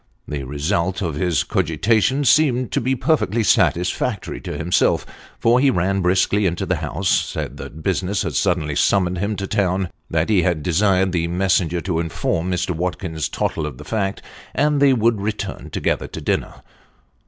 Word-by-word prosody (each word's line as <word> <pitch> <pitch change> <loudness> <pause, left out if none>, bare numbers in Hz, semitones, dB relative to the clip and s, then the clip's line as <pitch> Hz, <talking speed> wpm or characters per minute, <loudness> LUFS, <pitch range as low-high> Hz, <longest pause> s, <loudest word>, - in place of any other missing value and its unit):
The 75 -2 -4
result 85 +7 -1
of 85 -4 -2
his 85 +3 0
cogitations 105 - +1
seemed 130 -3 +3
to - - 0
be 130 +3 +1
perfectly 120 - +1
satisfactory 90 +3 +1
to - - -5
himself, 85 +3 +1 0.3
for 120 +2 +4
he 140 +1 +4
ran 95 -3 +1
briskly 95 +3 +2
into 85 +3 -2
the 90 0 0
house; 80 +5 -3
said - - 0
that 80 +1 -9
business 95 +2 0
had - - -3
suddenly 85 -6 0
summoned 90 0 +2
him 105 +3 -1
to 100 0 -4
town; 95 -3 0 0.2
that 80 +3 0
he 100 -4 +4
had 85 -3 0
desired 95 +2 +2
the 85 -2 0
messenger 90 -1 +1
to 85 -3 -1
inform 85 +1 -1
Mr. 90 +1 -1
Watkins 85 -2 -3
Tottle - - -2
of - - -8
the - - -11
fact; 100 -3 -2 0.3
and 150 0 +2
that - - +6
they 135 - +5
would 115 -3 +2
return 100 -1 -4
together - - -1
to - - -7
dinner. - - -2
95 Hz, 175 wpm, -21 LUFS, 85-105 Hz, 0.3 s, that